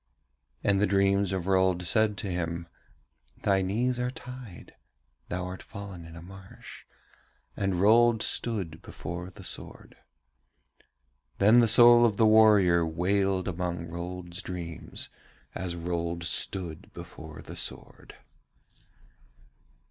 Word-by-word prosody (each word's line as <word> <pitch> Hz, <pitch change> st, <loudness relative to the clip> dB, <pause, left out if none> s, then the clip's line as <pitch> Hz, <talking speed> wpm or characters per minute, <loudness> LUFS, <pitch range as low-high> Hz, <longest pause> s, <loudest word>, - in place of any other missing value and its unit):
And 100 Hz, -1 st, +3 dB
the 105 Hz, -, +3 dB
dreams 100 Hz, 0 st, +2 dB
of 95 Hz, -3 st, -2 dB
Rold 95 Hz, -2 st, +2 dB
said 105 Hz, +4 st, +1 dB
to 100 Hz, -, -4 dB
him: 85 Hz, -2 st, -3 dB, 0.8 s
'Thy 95 Hz, -1 st, +3 dB
knees 120 Hz, +7 st, 0 dB
are 125 Hz, 0 st, 0 dB
tied, 125 Hz, -6 st, -10 dB, 0.6 s
thou 90 Hz, +1 st, -3 dB
art 90 Hz, 0 st, -7 dB
fallen 100 Hz, -5 st, -9 dB
in 80 Hz, 0 st, -12 dB
a 80 Hz, -, -10 dB
marsh,' 95 Hz, +1 st, -13 dB, 0.7 s
and 95 Hz, -2 st, -1 dB
Rold 110 Hz, +4 st, +4 dB
stood 105 Hz, -8 st, -1 dB
still 80 Hz, +1 st, -13 dB
before 85 Hz, +2 st, -7 dB
the 95 Hz, +1 st, -13 dB
sword. -, -, -8 dB, 1.4 s
Then 110 Hz, +5 st, +6 dB
the 120 Hz, -, +5 dB
soul 120 Hz, +1 st, +8 dB
of 110 Hz, -4 st, +2 dB
the 110 Hz, -, +4 dB
warrior 105 Hz, -6 st, +5 dB
wailed 95 Hz, +3 st, 0 dB
among 90 Hz, -1 st, -3 dB
Rold's 85 Hz, +1 st, -6 dB
dreams, 85 Hz, -4 st, -7 dB, 0.4 s
as 90 Hz, -2 st, -4 dB
Rold 85 Hz, 0 st, -3 dB
stood 85 Hz, -1 st, -4 dB
before 80 Hz, -2 st, -10 dB
the -, -, -9 dB
sword. -, -, -4 dB
95 Hz, 125 wpm, -28 LUFS, 85-105 Hz, 1.4 s, soul